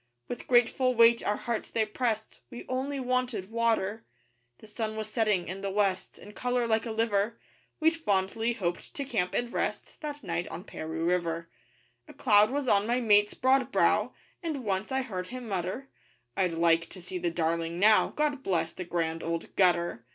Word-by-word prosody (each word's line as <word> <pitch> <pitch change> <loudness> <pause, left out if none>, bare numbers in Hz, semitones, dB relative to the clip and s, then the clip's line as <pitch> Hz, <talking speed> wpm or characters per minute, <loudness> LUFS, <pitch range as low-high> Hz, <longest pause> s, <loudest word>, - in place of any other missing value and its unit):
With 245 - -6
grateful 250 +1 +3
weight 230 0 +6
our 205 - +1
hearts 235 -2 -3
they 220 -1 +1
pressed 220 0 -2
We 240 -2 -9
only 270 +2 -2
wanted 255 -6 -1
water. 225 -2 0 0.5
The - - -15
sun 215 0 -4
was 215 -1 -5
setting 210 -6 +1
(in 190 +2 -5
the 200 - -2
west) 195 -2 0
In 205 - -12
colour 245 +2 -1
like 225 0 +1
a - - -3
liver 220 -1 0 0.4
We'd 320 +1 +3
fondly 220 -3 0
hoped 175 -6 -4
to 280 - -3
camp 195 -9 -1
and 240 0 -1
rest - - -3
That 295 -2 -6
night 170 +1 -2
on 175 - -7
Paroo 160 -4 -5
River. 170 -1 0 0.6
A - - -13
cloud 210 -3 +5
was 280 0 -2
on 205 -2 +3
my 240 +2 +2
mate's 210 -3 +4
broad 260 0 +2
brow, - - +2 0.3
And 310 -7 -3
once 195 +3 -1
I 265 0 0
heard 185 -7 -5
him 250 +1 -7
mutter: 195 +7 -3 0.5
'I'd 180 -3 +1
like 165 0 +2
to 190 - -10
see 180 +1 -5
the 175 0 0
Darling 165 0 -1
now, 215 +3 +5
'God 295 -2 -1
bless 170 -8 -1
the 180 - -6
Grand 165 -1 -2
Old 165 0 -4
Gutter! 175 -9 +2
215 Hz, 185 wpm, -29 LUFS, 180-245 Hz, 0.6 s, weight